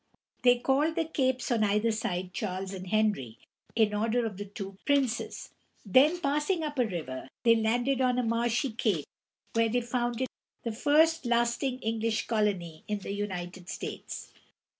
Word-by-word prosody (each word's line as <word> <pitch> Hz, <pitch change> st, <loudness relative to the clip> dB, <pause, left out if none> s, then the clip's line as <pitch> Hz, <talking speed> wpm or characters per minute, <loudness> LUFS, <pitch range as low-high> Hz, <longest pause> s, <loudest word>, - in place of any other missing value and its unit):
They 245 Hz, 0 st, +6 dB
called 280 Hz, +6 st, +2 dB
the 325 Hz, -, +1 dB
capes 260 Hz, -5 st, 0 dB
on 225 Hz, -2 st, +3 dB
either 210 Hz, +2 st, +2 dB
side 185 Hz, -4 st, -2 dB
Charles 190 Hz, 0 st, -3 dB
and 185 Hz, -1 st, -7 dB
Henry, 205 Hz, -, +1 dB, 0.4 s
in 220 Hz, -2 st, +3 dB
honor 230 Hz, +3 st, +1 dB
of 210 Hz, -4 st, -4 dB
the 205 Hz, -, -5 dB
two 195 Hz, -1 st, -8 dB
princes; 275 Hz, -5 st, 0 dB, 0.3 s
then, 285 Hz, -, +5 dB
passing 300 Hz, +3 st, 0 dB
up 295 Hz, -3 st, -3 dB
a 245 Hz, -, +3 dB
river, 155 Hz, -9 st, -5 dB
they 230 Hz, -1 st, +6 dB
landed 245 Hz, +4 st, +1 dB
on 250 Hz, -1 st, +3 dB
a 250 Hz, -, +2 dB
marshy 235 Hz, +3 st, +1 dB
cape, 210 Hz, -, 0 dB, 0.5 s
where 230 Hz, 0 st, +3 dB
they 245 Hz, +2 st, +1 dB
founded 240 Hz, +1 st, -1 dB, 0.4 s
the 230 Hz, -, -2 dB
first 300 Hz, +5 st, +3 dB
lasting 240 Hz, +2 st, +1 dB
English 225 Hz, 0 st, 0 dB
colony 195 Hz, -8 st, -1 dB
in 210 Hz, -1 st, -1 dB
the 200 Hz, 0 st, -5 dB
United 185 Hz, -3 st, -5 dB
States. -, -, -6 dB
230 Hz, 160 wpm, -29 LUFS, 205-255 Hz, 0.5 s, They